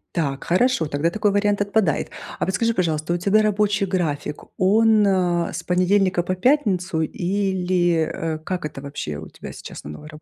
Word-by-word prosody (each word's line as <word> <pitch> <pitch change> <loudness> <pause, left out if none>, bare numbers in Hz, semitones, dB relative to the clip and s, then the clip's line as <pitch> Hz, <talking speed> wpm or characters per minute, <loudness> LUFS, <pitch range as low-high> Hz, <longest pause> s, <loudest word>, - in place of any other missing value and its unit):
Так, 140 -5 -1
хорошо, 185 -2 +2
тогда 145 +3 0
такой 210 +2 +1
вариант 205 0 +1
отпадает. 200 -6 +1 0.3
А - - -1
вот 190 - -2
скажи, 230 +5 +1
пожалуйста, 165 -4 0
у - - +1
тебя 200 +4 +3
рабочий 210 -1 +1
график, 160 -6 -2
он, 215 +2 +4
с 180 -3 0
понедельника 185 0 +2
по 185 +2 -2
пятницу 190 - +1
или, 180 -2 0
э, 160 -1 -3
как 180 +1 -4
это 150 -2 -6
вообще 140 - -5
у 80 - -9
тебя - - -10
сейчас - - -10
на - - -6
новой 150 - -10
работе? 155 0 -12
180 Hz, 175 wpm, -22 LUFS, 160-205 Hz, 0.3 s, он